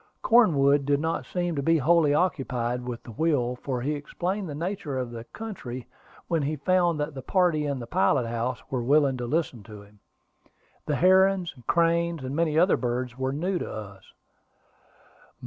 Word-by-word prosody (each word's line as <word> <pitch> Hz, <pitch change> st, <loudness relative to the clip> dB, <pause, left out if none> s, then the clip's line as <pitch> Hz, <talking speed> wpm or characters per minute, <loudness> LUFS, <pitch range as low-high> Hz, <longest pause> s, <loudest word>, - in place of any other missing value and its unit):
Cornwood 145 Hz, -, +4 dB
did 140 Hz, 0 st, +2 dB
not 160 Hz, +2 st, -2 dB
seem 175 Hz, -2 st, -2 dB
to 140 Hz, -, -1 dB
be 165 Hz, +4 st, +3 dB
wholly 160 Hz, +1 st, +3 dB
occupied 125 Hz, -7 st, -1 dB
with 120 Hz, -2 st, -5 dB
the -, -, -10 dB
wheel, 125 Hz, -2 st, 0 dB
for 125 Hz, -1 st, -3 dB
he 145 Hz, +4 st, -1 dB
explained 180 Hz, +6 st, -3 dB
the 145 Hz, -, -5 dB
nature 165 Hz, -4 st, -3 dB
of 125 Hz, -2 st, -3 dB
the 115 Hz, -1 st, -8 dB
country 130 Hz, -, -7 dB, 0.4 s
when 165 Hz, -2 st, 0 dB
he 145 Hz, +2 st, -1 dB
found 175 Hz, +2 st, +1 dB
that 150 Hz, +1 st, -2 dB
the 135 Hz, -, -7 dB
party 165 Hz, -1 st, +1 dB
in 140 Hz, -1 st, -2 dB
the 120 Hz, -, -6 dB
pilot 140 Hz, -3 st, +2 dB
house 120 Hz, +1 st, -3 dB
were 130 Hz, -2 st, -1 dB
willing 140 Hz, +2 st, +3 dB
to 120 Hz, -1 st, -4 dB
listen 145 Hz, -4 st, -1 dB
to 105 Hz, 0 st, -12 dB
him. 100 Hz, 0 st, -21 dB, 0.9 s
The 150 Hz, -, +1 dB
herons, 190 Hz, +1 st, +4 dB
cranes, 170 Hz, -2 st, +1 dB
and 130 Hz, +2 st, -4 dB
many 160 Hz, -1 st, +1 dB
other 180 Hz, +4 st, +4 dB
birds 125 Hz, 0 st, -2 dB
were 130 Hz, 0 st, -2 dB
new 175 Hz, +6 st, -1 dB
to -, -, -5 dB
us. 100 Hz, -3 st, -9 dB
145 Hz, 180 wpm, -26 LUFS, 125-170 Hz, 0.9 s, Cornwood